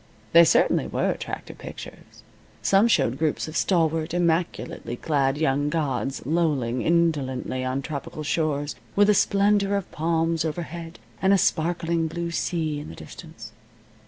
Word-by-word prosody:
They 170 0 +9
certainly - - +3
were - - 0
attractive - - -7
pictures. - - -11 0.4
Some 200 +3 +4
showed 130 - +2
groups 155 -1 0
of 155 - -8
stalwart, 165 -2 +1
immaculately 170 -7 -1
clad 140 0 0
young 145 -1 +1
gods 140 -4 -2
lolling 140 -6 0
indolently 140 -6 0
on 130 +2 -2
tropical 155 +1 -6
shores, 150 -2 -1 0.2
with 205 +1 +5
a - - +4
splendor 200 0 +2
of 200 - -6
palms 165 0 0
overhead, 165 -1 -5 0.2
and 190 +1 +4
a - - +5
sparkling 170 -1 0
blue 170 +1 -4
sea 160 -3 -1
in 145 - -8
the 80 - -9
distance. - - -11
160 Hz, 140 wpm, -25 LUFS, 145-170 Hz, 0.4 s, They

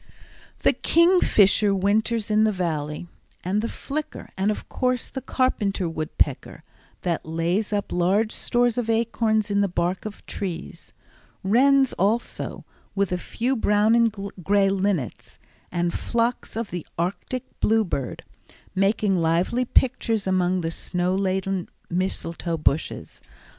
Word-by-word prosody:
The - - +4
kingfisher 220 - +4
winters 215 +3 +1
in 215 +1 +4
the 220 - +3
Valley, 160 -4 -3 0.4
and 195 +4 0
the 230 - -2
flicker 300 +2 -5
and, 195 +2 +1
of 215 - -3
course, 255 -2 -1
the 265 - -5
carpenter 210 -8 0
woodpecker, 155 -1 -2 0.4
that 170 -2 -1
lays 170 +7 -1
up 205 -1 -2
large 195 +5 +2
stores 245 -1 +1
of 230 -2 -3
acorns 225 -2 +1
in 200 0 +2
the 200 - +2
bark 175 +1 -1
of 215 -1 -8
trees; 180 -4 -6 0.5
wrens 265 +6 +4
also, 215 +6 -1 0.3
with 200 -2 +1
a 180 - 0
few 250 +8 -1
brown 210 -1 +3
and 230 -1 +4 0.3
gray 200 +2 +3
linnets, 190 - -2 0.3
and 175 -1 0
flocks 235 0 -1
of 230 -2 -3
the 175 -3 -4
arctic 185 +9 -2 0.2
bluebird, 205 - 0 0.5
making 195 -1 +2
lively 175 +10 +1
pictures 235 -4 +1
among 185 -1 +1
the 165 -1 -2
snow 180 +2 -1
laden 190 -1 -1 0.2
mistletoe 170 -2 -2
bushes. 150 0 -1
200 Hz, 130 wpm, -24 LUFS, 180-225 Hz, 0.5 s, The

